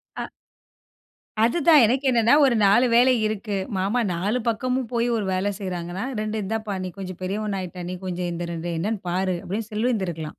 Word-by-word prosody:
அ - - -5 1.1
அதுதான். 300 +4 +5
எனக்கு 260 +5 0
என்னான்னா, 235 +2 +4
ஒரு 250 -3 +3
4 210 +6 +5
வேலை 255 +2 +6
இருக்கு. 210 -1 -3 0.2
மாமா 200 +6 0
4 205 +8 -1
பக்கமும் 250 +1 -1
போயி 235 0 +1
ஒரு 205 - -2
வேல 195 +2 0
செய்றாங்கன்னா, 180 +2 -4 0.2
2 215 0 -2
இந்தாப்பா 215 0 -3
நீ - - -4
கொஞ்சம் 185 -2 -7
பெரியவனா 200 +1 -2
ஆயிட்ட, 180 0 -7
நீ - - -4
கொஞ்சம் 180 -1 -3
இந்த 170 0 -4
2 170 +1 -4
என்னான்னு 210 +3 -2
பாரு, 185 0 0
அப்படின்னு 210 +4 -4
சொல்லிருந்து 215 -3 0
இருக்கலாம். 160 -2 -5
205 Hz, 175 wpm, -24 LUFS, 185-235 Hz, 1.1 s, வேலை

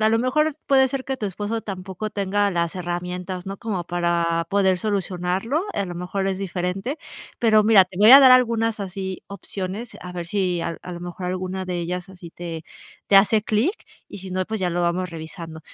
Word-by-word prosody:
a 215 - +4
lo 225 +1 +3
mejor 305 +5 +2
puede 265 -1 +5
ser 270 0 -4
que 265 - -2
tu 215 - -5
esposo 205 +4 -3
tampoco 190 +1 -5
tenga 205 0 0
las 170 -2 -1
herramientas, 180 +1 -4
no 195 +1 -5
como 195 -6 -3
para 170 -1 0
poder 190 -2 +3
solucionarlo. 195 - -1
A 200 - -1
lo 175 - -6
mejor 180 +3 -3
es 190 - -2
diferente, 195 - -3 0.4
pero 215 -2 +5
mira, 210 -4 +7
te 185 0 -15
voy 215 +2 +7
a 275 +2 +12
dar 260 -1 +9
algunas 225 -3 +3
así 190 -1 -5
opciones, 200 +3 -6
a 180 0 -8
ver 175 -1 -5
si 185 -3 0
a 165 0 -3
a 180 - -7
lo 175 - -7
mejor 175 +1 -6
alguna 185 +1 -3
de 180 -1 -3
ellas 180 +2 -4
así 180 -3 -11
te 170 -2 -7 0.4
te 200 - +5
hace 210 +2 +5
clic, 220 - +1 0.4
y - - -9
si 190 0 -8
no, 185 0 -1
pues, 220 +2 -4
ya 180 - +1
lo 175 +1 -1
vamos 175 +1 0
revisando. 160 0 -8
190 Hz, 205 wpm, -23 LUFS, 180-215 Hz, 0.4 s, a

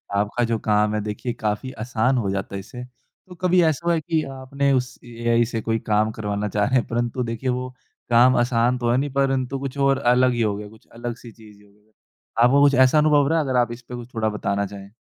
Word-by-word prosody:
आपका 105 +4 0
जो 115 -1 0
काम 105 0 +1
है 105 - -1
देखिए 105 +3 -4
काफ़ी 110 +3 -3
आसान 125 +2 0
हो 100 -5 -1
जाता 100 0 -4
इससे, 115 +6 -8
तो 125 +8 -18
कभी 180 0 +3
ऐसा 160 0 0
हुआ 170 - +3
कि 155 0 -1
आपने 140 +1 -1
उस 125 0 -1
एआई 120 0 0
से 115 -1 -4
कोई 115 0 -1
काम 110 +1 +2
करवाना 105 -1 -3
चाहें 120 +4 +2
परंतु 120 +2 -2
देखिए 115 +2 -3
वो 125 +1 -2 0.4
काम 125 +2 +5
आसान 120 0 +2
तो 120 -1 -1
है 120 - +2
नहीं, 140 +2 -1
परंतु 135 -1 0
कुछ 135 0 -6
और 140 -1 +2
अलग 125 0 +3
ही 120 - -1
हो 105 -2 +1
गया, 105 0 -8
कुछ 110 0 -20
अलग-सी 120 0 -7
चीज़ 105 -2 -17
हो 100 - -23
गई। 105 +1 -31 0.5
आपको 140 +4 +5
कुछ 140 -1 +5
ऐसा 130 +3 +5
अनुभव 150 -2 +4
रहा 165 +2 +1
है? 155 - -1
अगर 130 -2 0
आप 120 -1 +1
इस 120 +1 -8
पे 125 0 -9
कुछ 120 +1 -10
थोड़ा 110 -1 0
बताना 100 -1 -2
चाहें? 100 +1 -10
120 Hz, 225 wpm, -22 LUFS, 110-130 Hz, 0.5 s, काम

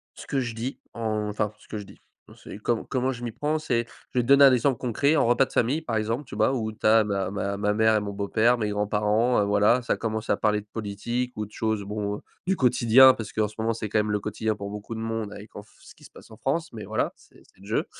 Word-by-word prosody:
ce - - -11
que 135 - 0
je 120 -2 -4
dis, 120 +4 -5
enfin 105 -2 -2
ce - - -20
que 110 - -4
je 105 - -6
dis, - - -15 0.3
non - - -15
c'est - - -10
com 115 +2 -1
comment 130 0 0
je 120 -1 -9
m'y 120 - -3
prends 150 +7 -1
c'est 120 -6 -1 0.3
je 125 - 0
vais - - +4
te - - -7
donner 140 +1 +7
un 135 - +9
exemple 130 +1 +2
concret 140 +6 +1
en - - +3
repas 120 +3 +4
de - - -15
famille, 135 +7 +1
par 125 -8 -3
exemple, 115 +6 -1
tu 125 - -9
vois? 110 +5 +2
Où 110 -4 -2
tu 110 - -9
as 110 0 +6
ma 100 -2 -2
ma 100 0 -2
ma 105 +1 0
mère 110 +1 +3
et 105 - +2
mon 100 0 -4
beau 100 0 -4
père, 115 +4 +3
mes 110 -2 -1
grands 105 0 -1
parents, 105 +4 +2
heu, - - +1
voilà, 105 +4 +3
ça 120 - 0
commence 110 -1 -4
à - - +4
parler 105 -1 +1
de 105 - -13
politique 115 +4 -3
ou 105 - -2
de 105 - -17
choses 110 -2 -1
bon, 105 0 -3 0.2
du 190 +1 +1
quotidien, 130 +1 +6
parce 110 -4 -7
qu'en 110 -1 0
ce 105 - -14
moment, 110 +1 0
c'est 110 -1 -4
quand 105 +1 +1
même 105 0 0
le 105 - 0
quotidien 105 +1 -2
pour 100 0 -6
beaucoup 105 +2 -7
de - - -5
monde 115 -2 -3
avec 105 +1 -11
en 105 - -8
f 105 - -25
ce - - -16
qui - - -21
se - - -15
passe - - -16
en - - -11
France. 165 +6 -2
Mais 110 -2 -7
voilà, - - -1
c'est - - -22
c'est - - -25
le - - -14
jeu. 110 - 0
110 Hz, 295 wpm, -26 LUFS, 105-120 Hz, 0.3 s, un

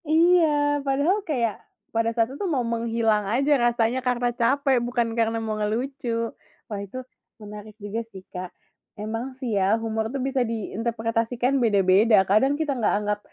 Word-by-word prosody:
Iya, 340 +2 +5 0.4
padahal 285 +7 +1
kayak, 235 -8 0 0.4
pada 225 0 +1
saat 230 +2 +1
itu 285 - -4
mau 270 -6 0
menghilang 230 -2 0
aja 270 +7 +1
rasanya 240 +1 +2
karena 245 -1 0
capek 265 +2 +2
bukan 240 -1 -1
karena 225 0 0
mau 220 -1 -2
ngelucu, 245 +5 -2 0.6
wah 205 - -3
itu 200 +5 -8 0.4
menarik 210 0 -10
juga 210 +2 -4
sih, 190 -3 -11
Kak. 180 0 -5 0.5
Emang 220 +3 -4
sih 250 -5 -3
ya 195 +3 +3
humor 220 -1 -2
tuh 275 - -2
bisa 265 0 0
diinterpretasikan 230 +3 -1
beda-beda 205 0 +4
kadang 215 +8 +3
kita 300 -3 0
nggak 235 -4 +1
anggap 210 0 -1
230 Hz, 155 wpm, -24 LUFS, 215-260 Hz, 0.6 s, Iya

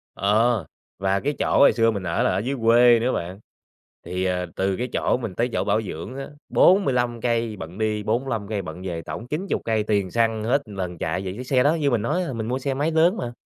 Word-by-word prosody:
Ờ, 110 0 +2 0.3
và 95 0 +1
cái 145 +6 -1
chỗ - - +1
hồi 140 - +7
xưa 115 -1 +3
mình 100 -3 -4
ở 85 -2 0
là - - +2
ở 90 - 0
dưới 130 +7 -2
quê 120 +1 +6
nữa 125 +3 0
bạn, 90 +3 -4 0.7
thì, 90 +1 -2
ờ, 90 -1 0
từ 95 0 0
cái 125 - -2
chỗ - - +1
mình 115 -7 -5
tới 120 +2 0
chỗ - - 0
bảo 105 +2 +1
dưỡng 100 +3 -7
á, 135 - -5 0.2
45 125 - +3
cây 115 -2 0
bận 85 +1 -8
đi, 110 -1 -1
45 115 -1 -1
cây 105 -2 -2
bận 90 0 -8
về, 90 -3 -4
tổng 115 +7 -7
90 170 +8 -2
cây 110 -2 +1
tiền 100 -4 0
xăng 115 -2 +1
hết 130 +6 +2
lần 95 -5 -5
chạy 85 +4 -2
về. 95 - -4
Chiếc 125 - -7
xe 130 0 +2
đó 150 +3 +4
như 145 -4 0
mình 120 -3 +1
nói 155 - 0
á, 135 - -4
mình 110 -1 -4
mua 130 +2 -1
xe 135 0 -2
máy 145 +4 0
lớn 165 +6 +3
mà. 120 - -4
115 Hz, 245 wpm, -23 LUFS, 100-125 Hz, 0.7 s, hồi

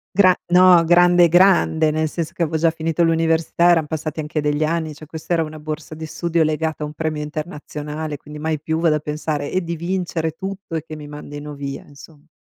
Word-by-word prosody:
Gra 185 -2 +6
no, 180 -1 +6
grande, 175 +1 +5
grande, 175 -3 +4
nel 155 +1 0
senso, 165 +1 -4
che 175 - -2
avevo 160 0 0
già 165 +1 +3
finito 165 0 -1
l'università, 165 +1 +2
eran 165 -3 +3
passati 155 0 -4
anche 150 0 -3
degli 150 +1 0
anni. 160 0 -1
Cioè, 150 +1 -12
questa 160 +3 -6
era 165 -1 +2
una 155 0 -6
borsa 155 +1 -6
di 160 +1 -7
studio, 170 +1 -1
legata 155 0 -1
a - - -1
un 150 - -7
premio 155 -1 -3
internazionale, 150 -1 -5
quindi 150 +1 -11
mai 155 -1 -2
più 160 +1 -2
vado 165 -2 +3
a - - 0
pensare 150 -1 -3
e 185 - 0
di 170 0 -3
vincere 170 -2 -2
tutto 190 0 -7
e 160 - -1
che 155 - -7
mi 150 -1 -9
mandino 145 0 -8
via, 140 -1 -6
insom 145 +2 -16
160 Hz, 215 wpm, -20 LUFS, 150-170 Hz, -, Gra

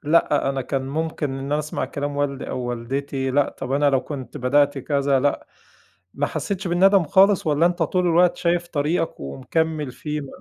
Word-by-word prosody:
لأ 150 -2 +2
أنا 135 -1 -1
كان 135 +1 -2
ممكن 155 0 -2
إن 135 - -5
أنا 140 +2 -1
أسمع 150 0 -3
كلام 145 0 -4
والدي 140 -2 -2
أو - - -3
والدتي، 130 +3 -3
لأ 140 +1 +2
طب 135 -1 -4
أنا 145 +1 +3
لو 135 -1 +2
كنت 135 0 -7
بدأت 145 +1 +2
كذا 140 -1 +1
لأ، 145 +1 0 0.7
ما 145 +1 0
حسّيتش 195 -2 -3
بالندم 190 +2 +4
خالص؟ 195 +4 +4
والّا 155 +2 +3
أنت 175 0 0
طول 180 -1 +1
الوقت 175 +1 +4
شايف 175 0 0
طريقك 160 +2 -1
ومكمّل 145 - -2
فيه؟ 150 +2 -4
م 140 - -7
145 Hz, 185 wpm, -22 LUFS, 135-165 Hz, 0.7 s, بالندم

